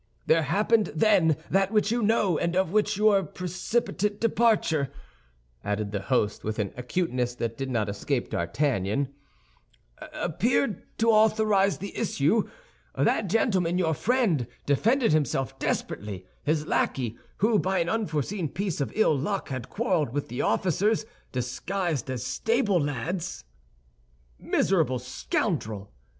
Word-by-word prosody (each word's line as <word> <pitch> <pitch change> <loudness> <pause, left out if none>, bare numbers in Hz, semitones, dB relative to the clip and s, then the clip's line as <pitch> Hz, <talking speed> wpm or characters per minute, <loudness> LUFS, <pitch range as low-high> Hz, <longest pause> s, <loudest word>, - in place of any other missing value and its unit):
There 165 - +4
happened 210 +6 +2
then 165 -4 +4
that 195 +1 +3
which 215 -1 +2
you 240 +1 +1
know, 210 -5 +2
and 170 +2 -1
of 185 -2 +1
which 210 0 +1
your 210 -2 +4
precipitate 195 +4 -2
departure," 215 - +2 0.7
added 105 0 -2
the 100 -1 -2
host, 105 -1 0
with 110 0 -3
an 105 -4 -2
acuteness 125 -2 -1
that 115 -1 -3
did 135 +2 -4
not 115 -4 0
escape 100 0 -2
D'Artagnan, 125 - 0 1.0
"appeared 220 - 0 0.2
to 230 0 +4
authorize 215 -2 +3
the 200 +1 -7
issue. 210 -1 +1 0.5
That 210 - +1
gentleman, 185 -4 +2
your 165 -3 +2
friend, 195 - +1 0.2
defended 225 - +3
himself 135 -3 0
desperately. 100 -7 -3 0.2
His 150 0 0
lackey, 120 -6 -1 0.2
who, 215 0 +3
by 190 +1 0
an 170 - +1
unforeseen 175 -4 -1
piece 190 -4 -3
of 140 - -2
ill 220 -8 +4
luck, 155 +9 -2
had 130 -3 -5
quarreled 180 - 0
with 145 0 -3
the 125 - -3
officers, 190 - +1 0.3
disguised 145 - -2
as 125 -4 -3
stable 225 -5 +1
lads—" 145 +5 -3 1.0
"Miserable 160 -9 +1
scoundrel!" 120 - -3
170 Hz, 130 wpm, -27 LUFS, 130-210 Hz, 1.0 s, There